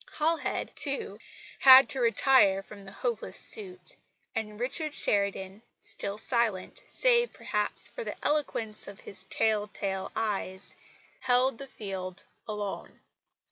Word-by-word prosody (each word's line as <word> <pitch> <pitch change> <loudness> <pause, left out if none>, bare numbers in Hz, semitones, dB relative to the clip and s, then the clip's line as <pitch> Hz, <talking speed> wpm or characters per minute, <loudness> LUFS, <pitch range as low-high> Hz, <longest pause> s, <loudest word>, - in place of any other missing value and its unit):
Halhed, 320 +1 -1
too, 275 -8 -2 0.4
had 265 0 +9
to 270 - +2
retire 230 -5 +4
from 205 0 -12
the 195 - -10
hopeless 235 +2 -3
suit; 375 -4 -3 0.4
and 210 -1 -4
Richard 300 +5 -2
Sheridan, 200 0 +1 0.2
still 200 +1 -5
silent, 235 - -1
save, 485 -1 +3
perhaps, - - 0
for - - -7
the - - -5
eloquence 230 -8 -2
of 200 +1 -11 0.3
tell 215 -2 +1
tale 195 -2 -4
eyes, 190 -3 -3 0.5
held 250 0 +2
the 275 - -7
field 190 -6 -6 0.2
alone. 210 -2 -6
220 Hz, 120 wpm, -29 LUFS, 200-270 Hz, 0.5 s, had